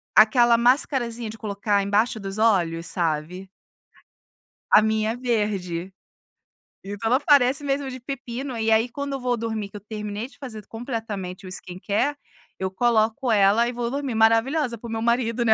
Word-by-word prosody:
aquela 235 Hz, +2 st, +6 dB
mascarazinha 240 Hz, -2 st, +1 dB
de 220 Hz, -, -9 dB
colocar 205 Hz, -1 st, 0 dB
embaixo 215 Hz, +4 st, +1 dB
dos 195 Hz, 0 st, -6 dB
olhos, 175 Hz, -7 st, +2 dB
sabe? 170 Hz, +3 st, -2 dB, 1.2 s
A -, -, +8 dB
minha 220 Hz, 0 st, +1 dB
é 230 Hz, -, -4 dB
verde. 200 Hz, -7 st, -2 dB, 0.9 s
Então 205 Hz, +3 st, -4 dB
ela 255 Hz, -, +4 dB
parece 285 Hz, -1 st, +4 dB
mesmo 275 Hz, -1 st, -1 dB
de 255 Hz, -, -7 dB
pepino, 250 Hz, -1 st, -5 dB
e 225 Hz, 0 st, +1 dB
aí 225 Hz, +2 st, +3 dB
quando 280 Hz, +3 st, -5 dB
eu 270 Hz, -, -3 dB
vou 245 Hz, -1 st, 0 dB
dormir, 220 Hz, -2 st, -3 dB
que 210 Hz, -, -9 dB
eu -, -, -11 dB
terminei 210 Hz, +1 st, -5 dB
de -, -, -21 dB
fazer 220 Hz, -7 st, -8 dB
completamente 220 Hz, -6 st, -5 dB
o -, -, -8 dB
skincare, 200 Hz, +10 st, -2 dB, 0.4 s
eu 190 Hz, 0 st, -3 dB
coloco 230 Hz, +3 st, +1 dB
ela 210 Hz, +3 st, +4 dB
e -, -, -2 dB
vou 240 Hz, 0 st, -3 dB
dormir 275 Hz, -4 st, -3 dB
maravilhosa 235 Hz, +3 st, +2 dB
para 235 Hz, -, -8 dB
o -, -, -7 dB
meu 225 Hz, 0 st, -2 dB
marido, 235 Hz, 0 st, +1 dB
né, 220 Hz, -, +6 dB
225 Hz, 170 wpm, -24 LUFS, 205-245 Hz, 1.2 s, A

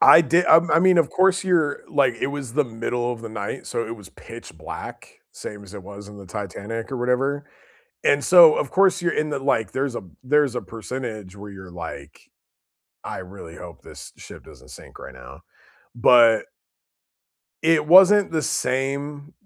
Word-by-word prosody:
I -, -, +8 dB
did 170 Hz, +3 st, +1 dB
I -, -, +7 dB, 0.2 s
I 170 Hz, -, +5 dB
mean, 185 Hz, +1 st, +4 dB
of 165 Hz, -4 st, +2 dB
course, 190 Hz, +1 st, +2 dB
you're 160 Hz, -6 st, +1 dB
like 130 Hz, -4 st, +2 dB
it -, -, -1 dB
was 140 Hz, -4 st, -7 dB
the 150 Hz, -1 st, +2 dB
middle 120 Hz, +1 st, -3 dB
of 115 Hz, -, -9 dB
the 115 Hz, -, -8 dB
night, 105 Hz, -2 st, -6 dB
so 115 Hz, -, -4 dB
it 115 Hz, -, -6 dB
was 105 Hz, -4 st, -14 dB
pitch -, -, -13 dB
black, -, -, -10 dB
same 105 Hz, -1 st, -9 dB
as 100 Hz, -, -14 dB
it 100 Hz, -, -9 dB
was 100 Hz, +1 st, -11 dB
in 105 Hz, -, -13 dB
the 100 Hz, -, -12 dB
Titanic 105 Hz, +4 st, -7 dB
or 135 Hz, -, -4 dB
whatever, 135 Hz, +4 st, -1 dB, 0.6 s
and -, -, +2 dB
so, -, -, +7 dB
of -, -, -2 dB
course, 195 Hz, -1 st, +2 dB
you're 170 Hz, -, -1 dB
in 155 Hz, 0 st, -2 dB
the 145 Hz, -, -3 dB
like, 115 Hz, -7 st, -1 dB
there's 135 Hz, -2 st, -3 dB
a -, -, -5 dB, 0.2 s
there's 145 Hz, -1 st, +1 dB
a 125 Hz, -, -3 dB
percentage 110 Hz, -4 st, -8 dB
where 100 Hz, 0 st, -11 dB
you're 95 Hz, -2 st, -12 dB
like, 85 Hz, -2 st, -9 dB, 0.9 s
"I -, -, -6 dB
really 90 Hz, -2 st, -11 dB
hope 85 Hz, -3 st, -12 dB
this -, -, -13 dB
ship -, -, -13 dB
doesn't -, -, -17 dB
sink -, -, -14 dB
right -, -, -11 dB
now." 65 Hz, +2 st, -13 dB, 0.5 s
But 115 Hz, -2 st, +5 dB, 1.2 s
it 160 Hz, -2 st, +2 dB
wasn't 190 Hz, +4 st, +6 dB
the 160 Hz, -1 st, -1 dB
same, 140 Hz, +3 st, -3 dB
125 Hz, 185 wpm, -22 LUFS, 105-150 Hz, 1.2 s, I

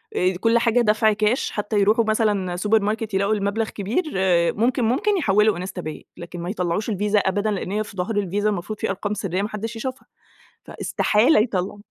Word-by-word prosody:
آآ 185 Hz, +1 st, +1 dB
كلّ 230 Hz, +2 st, +3 dB
حاجة 235 Hz, +1 st, +2 dB
دفْع 215 Hz, 0 st, +3 dB
كاش 215 Hz, +4 st, 0 dB
حتى 210 Hz, 0 st, -1 dB
يرُوحوا 215 Hz, +3 st, +3 dB
مثلًا 205 Hz, -5 st, 0 dB
سوبر 210 Hz, +4 st, +2 dB
ماركت 215 Hz, 0 st, -2 dB
يلاقوا 200 Hz, +2 st, +1 dB
المبلَغ 210 Hz, +2 st, -1 dB
كبير، 220 Hz, -, -2 dB, 0.5 s
ممكن، 245 Hz, +4 st, +1 dB
ممكن 275 Hz, -, +1 dB
يحوّلوا 210 Hz, -, +3 dB
إنستا 185 Hz, 0 st, -5 dB
باي، 155 Hz, -2 st, -7 dB
لكن 175 Hz, +1 st, -8 dB
ما 175 Hz, -, -4 dB
يطلّعوش 185 Hz, +2 st, -2 dB
الفيزا 210 Hz, 0 st, +1 dB
أبدًا 205 Hz, +2 st, 0 dB
لأن 195 Hz, -2 st, -3 dB
هي 210 Hz, +1 st, 0 dB
في 200 Hz, -2 st, -13 dB
ضَهر 200 Hz, +5 st, -2 dB
الفيزا 205 Hz, +1 st, 0 dB
المفروض 200 Hz, +1 st, -4 dB
في -, -, -2 dB
أرقام 200 Hz, +2 st, -2 dB
سريّة 195 Hz, -2 st, -2 dB
ما 210 Hz, -, -2 dB
حدّش 225 Hz, +2 st, -5 dB
يشوفها، 260 Hz, +3 st, -6 dB, 0.6 s
فاستحالة 215 Hz, +6 st, +2 dB
يطلّع 205 Hz, -3 st, -1 dB
210 Hz, 185 wpm, -22 LUFS, 195-220 Hz, 0.6 s, كلّ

